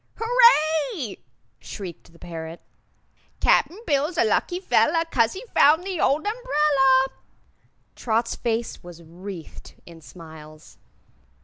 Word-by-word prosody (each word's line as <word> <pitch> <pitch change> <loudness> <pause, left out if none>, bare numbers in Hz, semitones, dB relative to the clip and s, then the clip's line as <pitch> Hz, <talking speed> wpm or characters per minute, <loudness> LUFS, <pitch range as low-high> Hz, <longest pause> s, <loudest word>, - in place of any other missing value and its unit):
"Hooray!" 320 - +2 0.4
shrieked 180 -5 -9
the 170 - -20
parrot; 165 -1 -8 0.8
"Cap'n 355 - +2
Bill's 300 +3 0
a - - +4
lucky 290 - 0
fellah, 335 -3 +2
'Cause 230 -3 +2
he 395 +6 -9
found 310 +5 +5
the 375 -3 -4
old 295 +6 +1
umbrella!" 300 - +2 0.9
Trot's 230 0 -1
face 230 -1 -3
was 175 -1 -13
wreathed 175 +1 -11
in 165 -1 -14
smiles. 155 -2 -14
260 Hz, 110 wpm, -23 LUFS, -, 0.9 s, found